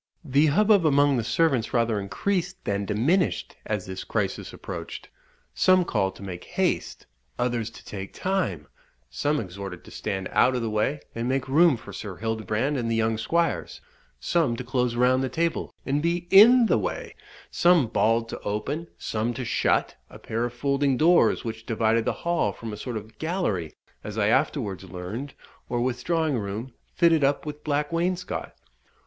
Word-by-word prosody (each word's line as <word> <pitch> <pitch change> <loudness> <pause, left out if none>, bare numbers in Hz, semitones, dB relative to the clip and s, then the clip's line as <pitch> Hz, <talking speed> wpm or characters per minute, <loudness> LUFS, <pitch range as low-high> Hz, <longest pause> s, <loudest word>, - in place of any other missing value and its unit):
The 145 +2 +3
hubbub 205 +5 +4
among 145 -2 +4
the 115 - 0
servants 130 -3 +1
rather 115 -3 +2
increased 180 - -2
than 100 0 -1
diminished 130 - +1
as - - -2
this - - -6
crisis - - -2
approached. - - -7 0.4
Some 185 -1 +4
called 95 - 0
to - - -11
make 90 -2 -6
haste, - - -1 0.3
others 120 -2 -1
to 115 - -15
take 95 -1 -7
time, 140 - -2 0.4
some 150 +1 0
exhorted 95 -3 -7
to - - -14
stand 95 -1 -3
out 130 +1 +4
of 125 - -1
the 110 - -2
way, 110 +7 0
and 115 +2 -2
make 135 0 0
room 150 0 +5
for - - -11
Sir 100 -4 -6
Hildebrand 110 +6 -1
and 115 -2 -2
the 115 - +1
young 110 0 +1
squires, 165 +10 -1 0.4
some 155 - +1
to 125 - -5
close 125 -1 0
round 130 +2 +3
the 130 - -1
table 165 +3 -1
and 140 +2 0
be 170 +2 -1
in 230 +5 +8
the - - +3
way, - - -4 0.4
some 175 -5 +4
bawled 115 0 +1
to - - -6
open, 135 +11 -3
some 115 +2 -2
to 125 0 -4
shut, - - +1
a - - -12
pair 115 +2 -2
of 120 - -5
folding 140 +1 +1
doors 170 +5 +4
which 115 -1 -6
divided 115 0 +1
the - - +1
hall 170 -11 +1
from 110 +2 -7
a - - -4
sort 120 +1 -4
of 110 +1 -10
gallery, 160 - -2 0.3
as - - -6
I - - +2
afterwards 95 -2 0
learned, 95 +10 -6 0.3
or 120 - -1
withdrawing 130 +4 0
room, 105 +5 -5 0.2
fitted 165 -4 +3
up 140 +2 +1
with 150 0 -7
black 145 0 -1
wainscot. 180 +2 -2
125 Hz, 175 wpm, -25 LUFS, 110-160 Hz, 0.4 s, in